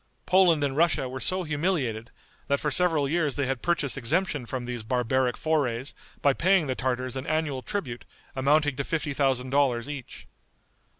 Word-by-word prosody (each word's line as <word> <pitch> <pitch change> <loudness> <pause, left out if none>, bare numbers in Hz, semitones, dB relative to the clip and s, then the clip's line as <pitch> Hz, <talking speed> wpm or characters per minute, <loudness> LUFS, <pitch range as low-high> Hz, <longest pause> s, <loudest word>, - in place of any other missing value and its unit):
Poland 180 -5 +4
and 135 -2 -1
Russia 160 -4 +2
were 130 +1 -6
so 185 +9 0
humiliated, 145 - -1 0.4
that 140 0 +1
for 150 - -1
several 160 -3 +2
years 155 -2 0
they 140 - 0
had 130 -1 -2
purchased 150 -7 0
exemption 145 0 0
from 125 -1 -4
these 120 -1 -4
barbaric 125 +2 0
forays 140 -5 -1 0.3
by 140 - +5
paying 185 +2 +3
the 130 - -1
Tartars 130 0 -2
an 130 +1 -5
annual 155 -4 -1
tribute 130 - -4 0.3
amounting 145 +1 +2
to 140 - -1
fifty 155 -1 -2
thousand 130 -2 0
dollars 135 -3 +2
each. 145 -4 -8
140 Hz, 170 wpm, -27 LUFS, 130-155 Hz, 0.4 s, by